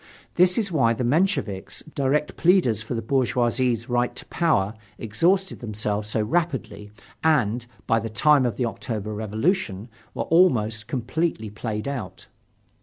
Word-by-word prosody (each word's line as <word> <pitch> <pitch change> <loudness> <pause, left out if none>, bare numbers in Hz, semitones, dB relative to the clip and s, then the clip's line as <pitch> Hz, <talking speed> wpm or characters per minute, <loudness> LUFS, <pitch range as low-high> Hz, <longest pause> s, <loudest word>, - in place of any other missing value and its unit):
This 180 +1 +4
is 205 -5 0
why 120 -8 +3
the 120 - -3
Mensheviks, 125 - 0
direct 140 +2 0
pleaders 170 - +3
for 110 +2 -4
the 115 - -3
bourgeoisie's 125 -1 +1
right 120 -1 0
to - - -7
power, 110 - +1 0.2
exhausted 175 - +1
themselves 105 -2 -3
so 110 0 0
rapidly 130 - -2 0.3
and, 125 -7 +2 0.2
by 115 -1 +2
the 115 +1 -4
time 140 +6 +4
of 120 -4 0
the 125 - 0
October 110 -2 -4
Revolution, 110 - -1 0.3
were - - -1
almost 110 -11 +2
completely 125 -3 -2
played 105 +1 -4
out. 110 -10 -5
120 Hz, 140 wpm, -24 LUFS, 110-155 Hz, 0.3 s, This